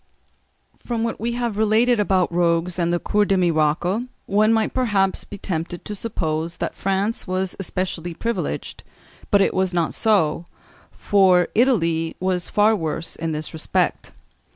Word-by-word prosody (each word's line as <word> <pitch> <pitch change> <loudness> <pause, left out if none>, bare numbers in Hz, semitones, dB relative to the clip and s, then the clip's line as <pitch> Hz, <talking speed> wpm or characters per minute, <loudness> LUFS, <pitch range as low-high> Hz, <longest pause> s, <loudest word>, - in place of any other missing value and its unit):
From 235 -2 -2
what 230 - -3
we 235 +2 -2
have 235 -3 -2
related 220 +2 +3
about 190 -4 +1
rogues 170 +1 +1
and 170 0 +1
the 175 - +2
Cours 205 +3 +1
des 195 - +2
Miracles, 175 +5 +1 0.2
one 210 +2 +3
might 220 -1 +1
perhaps 205 -7 +1
be 205 - -9
tempted 175 -2 -4
to 210 - -5
suppose 165 -6 -3
that - - -3
France 195 +4 -1
was 185 0 -2
specially 175 -2 -4
privileged; 230 +5 -4 0.5
but 200 -2 +4
it - - +2
was 185 -1 0
not 170 -2 0
so, 175 -7 +2 0.5
for 185 -3 +3
Italy 165 -10 +2
was 185 -1 -1
far 215 +1 +3
worse 165 -2 -2
in 165 0 -3
this 155 0 -4
respect. 160 - -1
190 Hz, 155 wpm, -22 LUFS, 170-215 Hz, 0.5 s, but